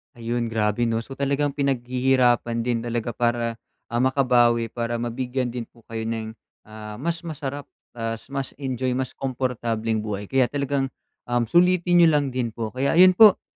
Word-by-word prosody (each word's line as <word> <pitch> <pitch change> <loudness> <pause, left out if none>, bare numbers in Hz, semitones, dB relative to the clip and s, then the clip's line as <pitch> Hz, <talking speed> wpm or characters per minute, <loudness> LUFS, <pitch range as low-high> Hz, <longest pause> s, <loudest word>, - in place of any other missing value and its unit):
Ayun, 120 0 -2
grabe 110 +1 0
'no? 115 0 -1
So, 135 +3 -10
talagang 140 +1 0
pinaghihirapan 125 -3 +1
din 120 -1 0
talaga 120 0 -3
para, 115 0 -1 0.3
ah, 120 - 0
makabawi, 120 -3 +3
para 120 0 -2
mabigyan 125 +2 -2
din 120 -1 -5
po 115 - -23
kayo 110 0 -3
ng, 110 -1 -3 0.3
ah, 105 0 -9
mas 165 +7 -2
masarap 145 -3 -5 0.3
tapos 115 +1 -4
mas 135 -1 -3
enjoy, 130 -1 -1
mas 130 0 -2
komportableng 115 -4 -2
buhay. 100 -1 -4
Kaya 135 -2 +3
talagang, 140 0 -1 0.4
uhm, 120 -2 0
sulitin 175 +1 +4
niyo 165 -2 +6
lang 145 -2 +2
din 125 -3 -2
po. 110 -1 -4
Kaya 135 +5 0
ayun 185 +1 +6
po, 215 -3 +8
120 Hz, 165 wpm, -24 LUFS, 115-135 Hz, 0.4 s, po